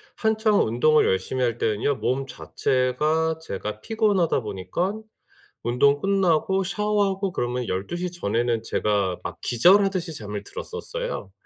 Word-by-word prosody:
한창 220 -1 +2
운동을 125 +8 +3
열심히 95 +7 0
할 120 -1 0
때는요 115 +6 0
몸 135 +2 -1
자체가 150 +6 0
제가 105 -5 -5
피곤하다 205 - +1
보니깐 115 - -3 0.6
운동 140 +4 +3
끝나고 190 0 +2
샤워하고 200 -1 0
그러면 125 -3 -2
12 95 - -3
시 180 0 -3
전에는 115 - -1
제가 100 -5 0
막 - - -6
기절하듯이 185 - +3
잠을 105 -5 -6
들었었어요. - - -6
150 Hz, 295 characters per minute, -24 LUFS, 115-195 Hz, 0.6 s, 운동을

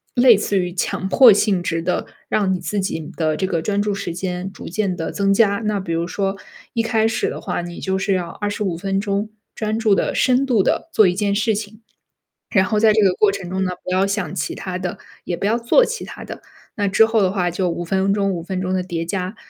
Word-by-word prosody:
类 245 -4 +7
似 200 -1 0
于 180 -1 -2
强 190 +1 -2
迫 240 0 +8
性 195 -2 +2
质 165 -1 -1
的， 180 +2 -1 0.2
让 195 -3 +1
你 180 - -2
自 205 +2 -2
己 190 -3 -2 0.2
的 155 -2 +1
这 190 - -1
个 170 -3 -1
专 205 -1 0
注 205 -1 0
时 200 -4 -4
间 180 +1 -4
逐 - - -9
渐 190 0 -1
地 165 -2 -4
增 195 -1 +1
加。 200 -1 +3
那 210 -1 0
比 175 -3 -5
如 165 +1 0
说 195 +1 -2 0.4
一 230 - +1
开 225 -1 +2
始 225 - -1
的 - - -6
话 - - -3
你 175 0 -7
就 190 0 -1
是 195 0 0
要 175 -2 -1
25 205 -3 -3
分 195 +1 -1
钟 205 +1 -2 0.3
专 215 0 -2
注 215 -3 +3
的、 - - 0
深 255 +2 +3
度 235 -7 +3
的 - - 0
做 215 -3 +6
一 180 - +1
件 200 0 0
事 220 +1 +1
情， 215 +1 -7 0.7
然 190 -4 +3
后 215 0 0
在 220 -1 +5
这 215 - +3
个 190 -2 +4
过 210 -2 +4
程 195 -3 -6
中 190 +1 -1
呢， 185 - -1
不 - - -4
要 190 +1 +3
想 200 -2 -2
其 - - -2
他 185 -1 -5
的， 180 -1 -4 0.3
也 175 - -3
不 - - -3
要 225 +3 +2
做 240 - +4
其 470 - -4
他 - - -9
的。 - - -8 0.3
那 205 -3 0
之 225 +3 +5
后 225 -1 +1
的 185 -1 +2
话 180 -3 0
就 180 0 -1
5 175 +1 -3
分 190 +2 +1
钟 195 -1 +1
5 170 - -4
分 185 +1 -3
钟 185 0 -2
的 185 - +1
叠 170 -2 -4
加， 185 +3 -3
195 Hz, 260 characters per minute, -20 LUFS, 180-210 Hz, 0.7 s, 迫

